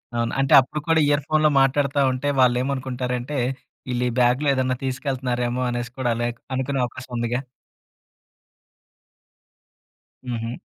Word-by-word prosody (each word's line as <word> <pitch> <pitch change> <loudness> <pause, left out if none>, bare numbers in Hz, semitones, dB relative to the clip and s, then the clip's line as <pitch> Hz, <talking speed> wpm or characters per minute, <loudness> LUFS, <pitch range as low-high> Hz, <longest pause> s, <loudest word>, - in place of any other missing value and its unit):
అవును. 115 0 0
అంటే, 135 0 +2
అప్పుడు 135 +4 -5
కూడా 165 -1 +4
ఇయర్ 145 0 +2
ఫోన్‌లో 155 0 +3
మాట్టాడతా 140 +1 +2
ఉంటే, 130 +3 -2
వాళ్ళేమనుకుంటారంటే, 125 +1 0 0.5
ఈళ్ళీ 125 0 0
ఈ - - -7
బ్యాగ్‌లో 125 +4 +3
ఏదన్నా 130 -1 0
తీసుకెళ్తున్నారేమో 125 -2 -2
అనేసి 120 0 -3
కూడా 125 -2 0
అలా 120 +1 -1 0.3
అనుకునే 130 +1 -1
అవకాశం 125 +1 -10
ఉందిగా? 120 +2 -1 2.9
హుహు. 115 -1 -3
130 Hz, 120 wpm, -23 LUFS, 120-135 Hz, 2.9 s, కూడా